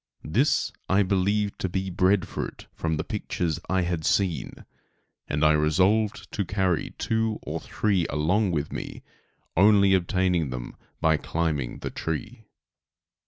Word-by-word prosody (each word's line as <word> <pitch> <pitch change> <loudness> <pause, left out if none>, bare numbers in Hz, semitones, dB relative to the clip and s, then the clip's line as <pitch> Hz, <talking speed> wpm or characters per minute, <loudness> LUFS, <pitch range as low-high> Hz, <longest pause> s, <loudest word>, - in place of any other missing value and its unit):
This 120 - +2 0.2
I 100 +2 +4
believed 100 +2 0
to 95 - -1
be 95 +1 -2
bread 95 +1 +2
fruit, - - -6
from 80 -1 -2
the 75 - -2
pictures 85 -5 -2
I 95 -1 +2
had 85 -2 -2
seen, 95 -3 0 0.6
and 75 +2 +1
I 75 - +6
resolved 95 +8 +2
to 100 - -1
carry 95 -3 -1
two 110 -1 0
or - - -4
three 95 -6 0
along 90 +8 +1
with 75 -4 -2
me, - - -6 0.5
only 100 +1 +6
obtaining 90 -3 +1
them 60 -1 -6 0.3
by 80 -1 +4
climbing 75 -4 -2
the - - -4
tree. 110 +9 -5
95 Hz, 140 wpm, -26 LUFS, 80-100 Hz, 0.6 s, I